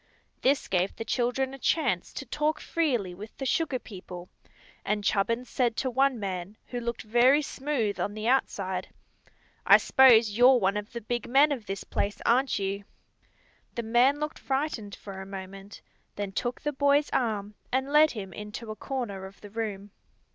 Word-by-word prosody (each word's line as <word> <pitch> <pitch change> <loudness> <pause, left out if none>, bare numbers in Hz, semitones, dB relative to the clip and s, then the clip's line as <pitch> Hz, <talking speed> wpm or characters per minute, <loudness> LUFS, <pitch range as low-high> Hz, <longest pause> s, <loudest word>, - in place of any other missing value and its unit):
This 275 +2 +2
gave 185 +1 0
the 225 - -6
children 260 +3 0
a 270 - -9
chance 255 - 0
to 275 - -6
talk 300 +4 -1
freely 245 - -1
with 210 +4 -11
the 270 - -4
sugar 290 -1 +1
people, 180 -6 -10 0.5
and 210 -1 -1
Chubbins 230 +5 0
said 240 -3 0
to 260 - -1
one 265 0 +2
man, 190 0 -5
who 245 - -3
looked 235 0 -4
very 245 +7 +4
smooth 260 -9 -2
on 205 +4 -2
the 215 +1 -3
outside: 190 -8 0 0.8
"I - - +8
s'pose 235 -5 +6
you're 250 +2 +7
one 195 -1 +1
of 210 +1 -4
the 235 - -5
big 240 +2 -3
men 280 +4 +5
of 240 -7 -4
this 195 +1 -4
place, 205 0 -2
aren't 260 +3 +3
you?" 200 0 -2 0.9
The 235 - -2
man 245 +6 +3
looked 300 0 -4
frightened 265 -7 -2
for 195 -2 -9
a - - -7
moment, 195 +1 -9
and - - -41
then 205 -1 -4
took 240 +5 -3
the 295 - -2
boy's 285 +1 +2
arm 210 -4 -1 0.2
and 265 +2 -1
led 305 +1 +7
him 195 -7 -7
into 210 +3 -7
a - - -6
corner 215 -6 -4
of 195 - -16
the 205 - -11
room. 205 -2 -4
230 Hz, 180 wpm, -28 LUFS, 200-265 Hz, 0.9 s, I